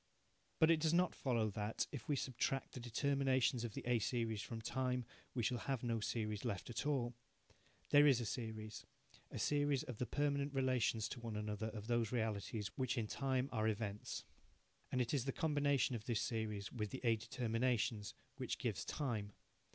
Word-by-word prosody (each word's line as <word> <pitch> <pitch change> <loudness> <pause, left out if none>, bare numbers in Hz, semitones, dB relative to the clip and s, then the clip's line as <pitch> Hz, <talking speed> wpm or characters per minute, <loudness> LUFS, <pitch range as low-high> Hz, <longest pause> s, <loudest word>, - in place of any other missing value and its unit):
But 160 +1 +6
it 165 - +5
does 160 +1 +3
not 180 0 +4
follow 115 -5 +1
that, 105 +2 -1
if 110 - -6
we 145 - +3
subtract 135 0 -1
the - - -6
determinations 130 +1 +2
of 115 -3 -4
the - - -4
A 120 -1 +3
series 110 -1 0
from 115 +2 -5
time, 125 +1 -1 0.3
we 120 - +1
shall 120 +2 +1
have 135 +1 -2
no 115 -2 +1
series 105 -1 -1
left 115 -1 -2
at 120 +5 -2
all. 125 -5 +1 0.8
There 145 0 +8
is 135 -4 +6
a 120 - -2
series 110 -2 -4 0.5
a - - -6
series 145 -2 +2
of 125 -5 -7
the 125 - 0
permanent 140 +1 0
relations 125 -4 +2
to - - -5
one 115 -2 -4
another 105 0 -2
of 110 -2 -6
those 120 -2 +1
realities 110 -2 -1
which 130 -1 0
in 115 - +1
time 130 +3 0
are 110 0 +1
events 105 -1 -2 0.7
and 125 - +2
it 120 - 0
is 135 -4 +1
the 135 - +1
combination 145 -4 +2
of 110 -1 -5
this 120 -4 +1
series 105 -4 -2
with 105 -4 -2
the 130 - -6
A 115 -2 +5
determinations 115 -1 0 0.2
which - - -2
gives - - -1
time. 110 -8 -2
120 Hz, 185 wpm, -39 LUFS, 110-130 Hz, 0.8 s, There